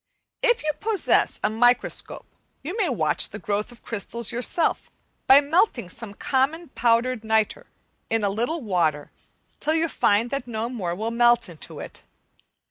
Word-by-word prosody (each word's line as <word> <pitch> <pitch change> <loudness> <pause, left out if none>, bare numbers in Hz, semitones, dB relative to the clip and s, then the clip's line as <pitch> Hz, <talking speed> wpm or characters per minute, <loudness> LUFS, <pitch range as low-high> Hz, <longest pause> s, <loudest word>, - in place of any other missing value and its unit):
If 480 -7 +2
you 305 - +1
possess 435 -2 +1
a - - +3
microscope 245 +3 +1 0.4
you 340 +8 -4
may 415 -7 0
watch 155 - +1
the 210 - -8
growth 210 +1 -3
of 240 - -17
crystals 230 +1 -3
yourself 250 +7 0 0.4
by 270 +2 +8
melting 285 - +1
some 205 0 -6
common 290 +9 0
powdered 235 -1 +1
nitre 220 - 0 0.4
in 225 -1 0
a 200 - +2
little 240 +11 -1
water 165 - 0 0.5
till 310 +2 +1
you 325 0 +2
find 230 -5 +1
that 275 -3 -3
no 225 0 -3
more 185 -9 -3
will 220 +4 -3
melt 240 -2 +3
in 165 -3 -13 0.2
it. - - -10
235 Hz, 155 wpm, -24 LUFS, 210-280 Hz, 0.5 s, by